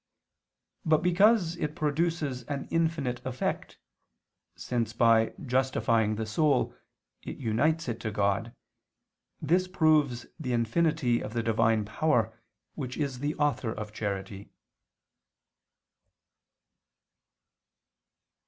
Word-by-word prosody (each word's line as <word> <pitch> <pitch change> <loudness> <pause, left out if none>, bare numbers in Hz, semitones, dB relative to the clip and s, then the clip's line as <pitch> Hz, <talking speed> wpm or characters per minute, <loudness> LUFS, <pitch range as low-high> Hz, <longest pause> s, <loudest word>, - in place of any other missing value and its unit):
But 155 -2 +2
because 180 -1 +3
it 150 -3 -3
produces 150 -3 -1
an 140 0 -4
infinite 155 -7 0
effect, 130 -1 -3 0.8
since, 115 -3 -2
by 115 -2 +4
justifying 115 -4 +1
the 110 +1 -3
soul, 140 +5 +1 0.5
it - - -7
unites 140 +8 0
it 115 -2 -3
to 110 - -3
God, 100 +2 0 0.9
this 180 +5 +2
proves 155 -9 +2
the 130 -5 -2
infinity 120 +2 +1
of - - -6
the 115 -1 -1
Divine 115 -1 +2
power, 115 -1 +1 0.4
which 130 -4 -5
is 140 -5 -2
the 145 +3 -2
author 145 -5 0
of 105 -1 -6
charity. 100 -1 -5
125 Hz, 100 wpm, -28 LUFS, 115-155 Hz, 0.9 s, by